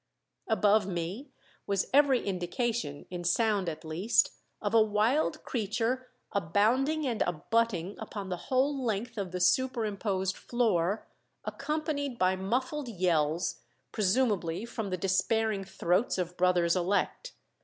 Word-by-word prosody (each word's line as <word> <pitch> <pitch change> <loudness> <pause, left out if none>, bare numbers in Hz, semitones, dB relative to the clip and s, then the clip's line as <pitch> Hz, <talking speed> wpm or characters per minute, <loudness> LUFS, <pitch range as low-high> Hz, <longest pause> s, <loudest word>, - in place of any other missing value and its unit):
Above 210 -2 +3
me 185 - -4 0.4
was 200 -1 +1
every 275 -3 +4
indication, 185 - -2
in 175 -1 -4
sound 200 +1 +2
at 160 0 -7
least, 170 +8 +2 0.3
of 205 0 -2
a 225 - +7
wild 220 +9 +1
creature 235 +3 -1 0.2
"abounding 230 - +2
and 235 -4 -1
abutting" 190 +2 0
upon 200 -2 -6
the 180 - -1
whole 270 +1 +2
length 230 +1 -2
of 195 -4 -4
the 180 - -3
superimposed 200 -3 +1
floor, 210 -5 0 0.4
accompanied 285 -2 -2
by 185 -1 +3
muffled 255 +9 -2
yells, 170 -4 0 0.3
presumably 205 -4 +1
from 225 -3 -4
the 185 - -2
despairing 200 +3 +1
throats 190 +3 0
of 180 -1 -3
brothers 180 -1 +3
elect. 195 - -1
205 Hz, 120 wpm, -30 LUFS, 180-240 Hz, 0.4 s, a